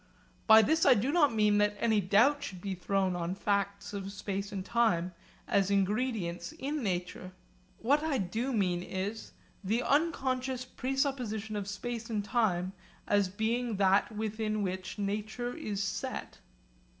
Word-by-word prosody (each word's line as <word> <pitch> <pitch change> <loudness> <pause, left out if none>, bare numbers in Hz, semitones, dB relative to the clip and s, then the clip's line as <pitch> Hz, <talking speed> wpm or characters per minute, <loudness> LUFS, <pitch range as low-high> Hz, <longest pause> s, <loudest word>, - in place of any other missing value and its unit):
By 220 0 +9
this 315 +9 +2
I - - +7
do 245 +7 0
not 300 -4 +4
mean 210 -2 +3
that 205 0 +2
any 220 -3 +3
doubt 230 +10 +4
should 190 -9 -6
be 195 +1 -4
thrown 185 0 0
on 175 +1 -2
facts 200 0 -1
of 195 -1 -4
space 200 0 -4
and 190 -2 -4
time 185 -7 +1 0.3
as 195 -1 +2
ingredients 200 -3 0
in 290 +2 -3
nature. 185 -2 -3 0.4
What 285 +6 +2
I 310 -3 0
do 225 +7 -2
mean 185 -6 +1
is 195 +4 -5 0.3
'the 225 +6 0
unconscious 265 -4 0
presupposition 250 -5 -2
of 205 -2 -3
space 230 +3 -5
and 210 -3 -2
time 195 -6 +1 0.3
as 205 -2 +3
being 225 +3 -1
that 195 +2 +3
within 215 0 -2
which 185 +1 -4
nature 215 +4 -3
is 210 -11 -3
set.' 195 - -4
210 Hz, 150 wpm, -31 LUFS, 195-240 Hz, 0.4 s, By